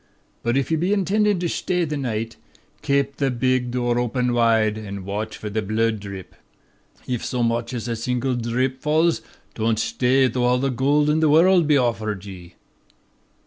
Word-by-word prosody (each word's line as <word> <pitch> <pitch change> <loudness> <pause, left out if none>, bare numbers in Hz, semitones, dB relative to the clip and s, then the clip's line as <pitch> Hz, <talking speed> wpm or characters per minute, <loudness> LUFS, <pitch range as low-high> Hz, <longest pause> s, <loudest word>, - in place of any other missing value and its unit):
But 120 +3 0
if 135 +2 -1
ye 160 - +2
be 175 +5 0
intendin' 205 0 +1
to - - -1
shtay 175 0 -1
this 150 -1 -3
night, 115 -3 -3 0.5
kape 140 0 0
the 140 -1 +1
big 130 0 0
dhoor 120 -1 0
open 125 0 0
whide, 115 -2 +3
an' 100 -3 -7
watch 105 +2 -4
for 110 - -7
the 105 +1 -2
bhlood 110 +2 0
dhrip. 100 -2 -9 0.7
If 125 -2 -3
so 125 -1 -1
much 115 0 -1
as 120 -2 -4
a 120 - -2
single 125 +3 -1
dhrip 125 +3 -1
falls, 160 +3 +1 0.3
don't 110 0 0
shtay 125 +2 +2
though 125 -1 +1
all 125 +1 +3
the 135 +1 0
gold 145 +4 +2
in 150 +1 +2
the 160 -1 +3
worrld 170 +1 +5
was 150 - +5
offered 110 -6 -1
ye.' 90 -3 -11
125 Hz, 185 wpm, -22 LUFS, 115-140 Hz, 0.7 s, worrld